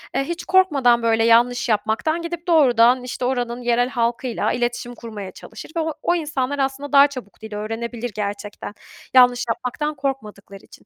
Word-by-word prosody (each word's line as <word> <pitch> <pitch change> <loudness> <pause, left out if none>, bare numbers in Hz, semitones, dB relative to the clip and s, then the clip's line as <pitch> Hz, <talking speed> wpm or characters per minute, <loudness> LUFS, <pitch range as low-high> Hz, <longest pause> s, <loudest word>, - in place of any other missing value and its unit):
eee, 275 - +1
hiç 340 +4 -5
korkmadan 280 -11 +3
böyle 225 -1 +2
yanlış 240 +2 +3
yapmaktan 220 +10 0
gidip 340 +1 -6
doğrudan 250 -6 +4
işte 250 0 -4
oranın 245 -1 -2
yerel 240 +1 +1
halkıyla 235 0 -1
iletişim 240 0 -3
kurmaya 210 -5 -8
çalışır - - -11
ve - - 0
o 320 -1 -1
o 350 - +1
insanlar 285 -4 -2
aslında 275 +1 -2
daha 280 0 +7
çabuk 255 -8 -10
dil 220 -1 -8
öğrenebilir 225 +2 -5
gerçekten. 205 0 -5 0.4
Yanlış 245 -1 +5
yapmaktan 295 +6 -3
korkmadıkları 210 -8 -6
için. - - -18
245 Hz, 160 wpm, -21 LUFS, 230-280 Hz, 0.4 s, daha